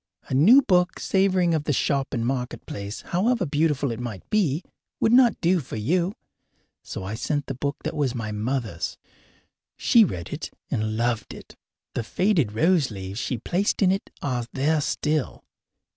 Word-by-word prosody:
A - - -3
new 215 - +7
book, 180 -3 +2
savouring 190 -3 +2
of 155 -2 0
the 150 - +1
shop 140 +1 +1
and 115 -4 -1
marketplace, 120 -5 -4
however 205 +3 +1
beautiful 145 -3 +1
it 115 - -5
might 115 -6 -6
be, 180 -6 +1 0.4
would 225 - +3
not 245 -2 +5
do 180 +1 +3
for 135 - -7
you. 170 - 0 0.7
So - - -7
I 95 +3 -4
sent 145 +5 -2
the - - -4
book 140 +2 -2
that - - -3
was 135 -4 0
my 110 -3 -3
mother's. 105 -5 -3 0.8
She 235 - +5
read 90 - -3
it - - -5 0.2
and 110 0 -1
loved 120 -1 -1
it - - -13 0.4
the - - -1
faded 165 - +1
rose 160 +4 +3
leaves 95 0 -6
she 125 0 -2
placed 185 - 0
in 185 - +5
it 195 - -2
are 125 -4 -1
there 150 +3 +1
still. 150 0 -1
140 Hz, 170 wpm, -25 LUFS, 115-180 Hz, 0.8 s, new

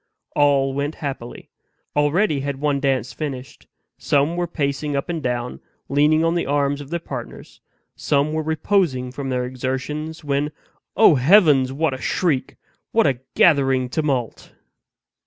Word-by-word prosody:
All 140 -2 +3
went 145 +3 -2
happily. 135 -5 -7 0.4
Already 150 +2 +2
had 140 0 -4
one 145 -1 0
dance 130 -3 0
finished; 135 -1 -7 0.3
some 145 +4 +1
were 175 0 -1
pacing 145 -2 -2
up 140 +5 -2
and 165 -2 -2
down, 125 -2 -3 0.3
leaning 150 +3 +3
on 165 0 +2
the 175 - -1
arms 145 0 0
of 140 - -10
their 170 +1 -2
partners; - - -9 0.3
some 145 +1 0
were 160 - 0
reposing 155 -5 0
from 135 +1 -5
their 125 -1 -1
exertions; 130 +6 -4
when 145 +1 -1 0.5
O 220 - +7
heavens! 145 -2 +5
what 150 +1 0
a 130 - -7
shriek! 145 -8 -1 0.4
what 225 - +3
a 135 -4 +1 0.2
gathering 135 -6 +3
tumult! 135 -5 -2
140 Hz, 145 wpm, -21 LUFS, 130-155 Hz, 0.5 s, O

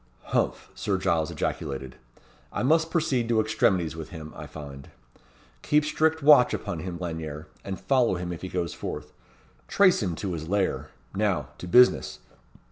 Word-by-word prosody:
"Humph!" - - 0
Sir 100 -2 -1
Giles 80 -4 +1
ejaculated. 65 -3 -4 0.6
"I - - -2
must 160 +4 +3
proceed 135 -8 0
to 115 -2 +3
extremities 95 -7 +1
with 80 -2 -7
him, 80 -3 -9
I - - -8
find. 70 -3 -10 0.7
Keep 150 0 +2
strict 155 +1 +1
watch 145 -4 +7
upon - - -4
him, 90 -2 -5
Lanyere; 80 -3 -5 0.2
and 95 -2 -5
follow 120 +2 +2
him 90 0 -4
if 85 - -8
he 95 - -5
goes 90 -3 -2
forth. - - -6 0.5
Trace 185 -7 +4
him 90 -5 -1
to 95 +1 -3
his 80 -1 -5
lair. 90 -8 0 0.2
Now - - 0
to 90 - -7
business. 125 +7 +5
95 Hz, 160 wpm, -26 LUFS, 80-125 Hz, 0.7 s, watch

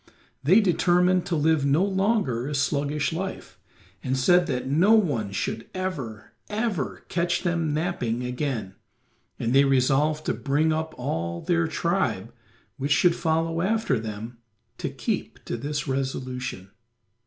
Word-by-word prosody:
They 180 - +5
determined 180 -1 +3
to 175 - 0
live 155 -1 +2
no 140 +6 +3
longer 190 - 0
a 150 - -3
sluggish 145 +2 0
life, 190 +3 -5 0.4
and 130 +1 0
said 175 +7 +4
that 125 -4 -2
no 170 +10 +4
one 140 - +1
should 115 +3 -3
ever, 145 -13 -4 0.2
ever 210 - -2
catch 175 0 0
them 170 -3 0
napping 145 -7 -1
again, 125 -5 -3 0.6
and 115 - -1
they 135 +1 +6
resolved 140 +3 +2
to - - +1
bring 150 +3 +1
up 160 0 -3
all 85 - -3
their 170 -1 +1
tribe 150 - -1 0.4
which 140 +1 -2
should 170 +3 +4
follow 165 0 0
after 200 - +1
them 110 +2 -7 0.4
to - - -2
keep - - -4
to - - -3
this 145 +5 -3
resolution. 130 -6 -3
150 Hz, 140 wpm, -25 LUFS, 125-175 Hz, 0.6 s, they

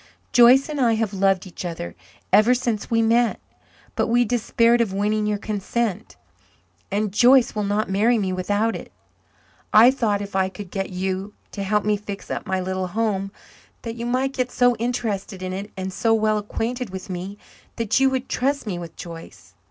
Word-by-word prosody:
"Joyce 245 +3 +6
and 300 -3 -3
I 235 -2 +4
have 220 -2 -1
loved 195 -1 +1
each 185 - -8
other 165 - -5 0.4
ever 230 +4 +6
since 235 -4 -2
we 230 -1 +2
met. 230 +1 +2 0.6
But - - +1
we 240 +1 +3
despaired 235 +1 +2
of 225 -4 0
winning 210 +2 0
your 210 -1 0
consent, 215 0 -3 0.7
and 205 +1 -1
Joyce 245 +3 +5
will 210 - -2
not 205 +2 0
marry 215 +5 +2
me 190 -3 -1
without 205 +5 0
it. - - -9 0.8
I 230 +4 +8
thought 220 -6 0
if 200 -1 -7
I 190 0 +2
could 195 -1 -10
get 195 -1 -3
you 190 +2 -3 0.2
to 200 - -6
help 210 +1 0
me 210 0 +2
fix 200 -1 -8
up - - -4
my 190 0 0
little 185 0 -2
home 195 -1 -1 0.5
that 230 - -4
you 235 0 -5
might 260 +2 0
get 255 -1 -2
so 245 -1 +3
interested 220 -5 -3
in 185 0 -3
it 200 +2 -5
and 190 0 -4
so 225 +4 +2
well 215 -1 +1
acquainted 230 +3 -3
with 190 0 -7
me 185 +2 -6 0.4
that 230 +1 +1
you 270 0 +4
would 260 0 -2
trust 280 +2 -1
me 185 -5 -3
with 170 -1 -9
Joyce. 165 -1 -11
210 Hz, 190 wpm, -23 LUFS, 195-235 Hz, 0.8 s, I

